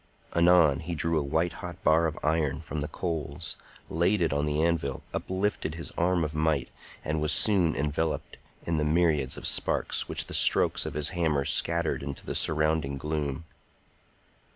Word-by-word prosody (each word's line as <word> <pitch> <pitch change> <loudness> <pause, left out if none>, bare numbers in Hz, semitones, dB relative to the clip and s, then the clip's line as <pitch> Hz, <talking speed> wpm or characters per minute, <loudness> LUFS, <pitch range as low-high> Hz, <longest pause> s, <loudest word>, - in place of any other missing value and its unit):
Anon 85 -4 +5
he 85 +1 -5
drew 80 +1 +1
a - - -2
white 80 +5 -1
hot 90 +1 -8
bar 80 +1 +4
of 80 - -5
iron 75 -3 0
from 75 -1 -5
the 75 - -2
coals, 80 -2 -4 0.3
laid 90 +6 +1
it 85 -4 +1
on 75 +1 0
the 75 0 -1
anvil, 80 -5 -1
uplifted 95 -4 -2
his 80 - -6
arm 90 0 0
of 75 -1 -3
might, 75 -2 0 0.4
and 75 0 -1
was 75 -1 +1
soon 90 -4 +4
enveloped 75 +3 -2 0.3
in 85 -1 -1
the 75 - 0
myriads 75 -4 +1
of - - -8
sparks - - 0
which - - +1
the - - -10
strokes - - +5
of - - -6
his 75 -1 +1
hammer 80 -6 0
scattered 85 +2 +1
into 70 0 -7
the - - -4
surrounding 75 -2 +1
gloom. 75 +1 -3
80 Hz, 175 wpm, -27 LUFS, 75-85 Hz, 0.4 s, Anon